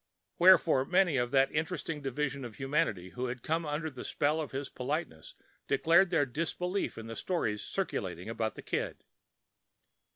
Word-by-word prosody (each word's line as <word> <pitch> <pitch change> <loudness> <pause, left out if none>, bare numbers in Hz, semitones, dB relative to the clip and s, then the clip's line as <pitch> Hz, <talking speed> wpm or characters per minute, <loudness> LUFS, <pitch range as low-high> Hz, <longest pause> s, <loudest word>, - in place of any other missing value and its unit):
Wherefore 170 -6 +6
many 180 -3 +3
of 120 -1 +1
that 135 0 +3
interesting 160 -1 -2
division 140 0 -2
of 120 -3 -7
humanity 135 - -1
who 125 +6 -3
had 125 0 -5
come 160 0 -1
under 150 +2 -2
the 130 - -8
spell 150 +2 0
of 150 - -4
his 135 +1 -4
politeness 130 - -4 0.3
declared 170 +3 +4
their 165 -5 +3
disbelief 170 +8 -2
in 115 - -7
the 115 0 -6
stories 115 - -1
circulated - - -3
about - - -2
Mr. - - -10
Kid. - - -3
145 Hz, 160 wpm, -31 LUFS, 130-165 Hz, 0.3 s, Wherefore